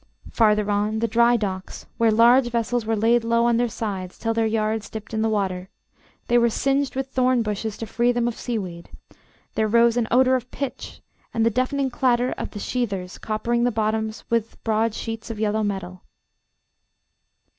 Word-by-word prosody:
Farther 210 -2 +3
on, 210 +2 0
the 230 +1 0
dry 235 +2 +4
docks, 190 -3 -5
where 230 -1 +4
large 240 +3 +5
vessels 235 -1 -1
were 225 - +1
laid 230 +2 +3
low 230 0 +2
on 235 -1 +3
their 240 0 +1
sides 195 -5 -5
till 225 0 -1
their 225 0 +1
yards 215 -1 -1
dipped 220 0 -8
in 220 - 0
the 225 - +1
water; 190 -3 -2 0.6
they 240 0 +4
were 235 0 +3
singed 275 +4 0
with 265 0 -3
thorn 255 -2 +2
bushes 210 0 -3
to 225 - -5
free 240 +2 +1
them 240 -1 0
of 240 - -2
sea 240 -2 -3
weed; 175 -4 -7 0.6
there 220 - +1
rose 235 +2 +4
an 235 -2 +1
odour 255 +2 +4
of 250 -1 -1
pitch, 275 -2 -6 0.3
and 225 -1 +2
the 230 - +3
deafening 260 +3 0
clatter 245 0 +1
of - - -5
the 205 - -8
sheathers 200 -7 -3
coppering 235 +2 -1
the 245 - +3
bottoms 220 -1 -2
with 230 -1 0
broad 225 0 +1
sheets 225 0 -5
of 225 -2 -5
yellow 215 0 0
metal. 190 -3 -4
225 Hz, 190 wpm, -23 LUFS, 215-240 Hz, 0.6 s, large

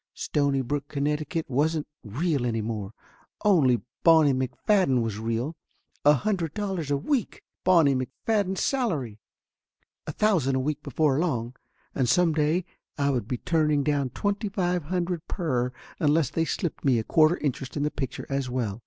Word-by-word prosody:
Stonybrook, 140 -1 -1
Connecticut, 150 +3 -2
wasn't 150 +4 0 0.2
real 140 - -1
any 115 -2 -1
more. 105 -3 -4 0.5
Only 140 - +4 0.2
Bonnie 160 -4 +6
Mc 130 -1 -1 0.2
Fadden 180 - +3
was 110 -2 -3
real. 115 +7 -2 0.5
A 145 - +7
hundred 170 -1 -1
dollars 190 -8 -3
a 145 - +2
week! 245 - -2 0.2
Bonnie 165 -6 +5
McFadden's 190 - -1
salary! 155 - -1 0.9
A - - -2
thousand 175 -11 +2
a - - +1
week 150 +2 -2
before 150 -3 +1
long. 125 -8 -1 0.4
And 130 -3 0
some 170 +4 +3
day 155 +3 +1 0.3
I 140 -1 +2
would 120 -6 -2
be 125 - -2
turning 150 -1 +1
down 145 -3 0
twenty 205 - -2
five 180 -5 -1
hundred 175 0 -2
per 125 -9 -1 0.3
unless 150 -2 +2
they 165 - 0
slipped 170 0 -3
me 130 -4 +3
a 110 - 0
quarter 155 +7 +4
interest 135 -1 -3
in 145 - 0
the 150 - 0
picture 135 -2 -5
as 135 -2 -2
well. 115 -4 -2
145 Hz, 160 wpm, -26 LUFS, 130-170 Hz, 0.9 s, A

